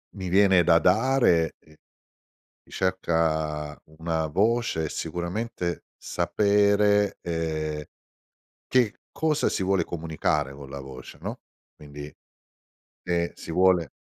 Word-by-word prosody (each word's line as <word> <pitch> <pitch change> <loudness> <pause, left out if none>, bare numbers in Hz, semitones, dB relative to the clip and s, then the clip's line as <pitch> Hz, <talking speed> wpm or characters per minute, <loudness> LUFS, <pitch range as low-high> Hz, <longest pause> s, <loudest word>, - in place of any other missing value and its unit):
mi 95 -2 -5
viene 95 -1 +5
da 85 -1 +5
dare 95 -4 +3
è 75 - -22 1.0
cerca 80 -5 -1 0.2
una 80 -1 -1
voce 105 0 +1
e - - -4
sicuramente 85 +2 -3
sapere, 105 0 +2
ehm, 80 -2 -3 0.8
che 125 -4 +2
cosa 155 -3 +1
si - - -2
vuole 95 -2 +2
comunicare 80 -4 -2
con 70 -1 -11
la 70 0 -7
voce, 65 -1 -10
no, - - -5 0.4
quindi, 75 0 -10 0.9
e 85 -1 0
si - - -8
vuole 90 -2 +3
85 Hz, 105 wpm, -26 LUFS, 80-100 Hz, 1.0 s, viene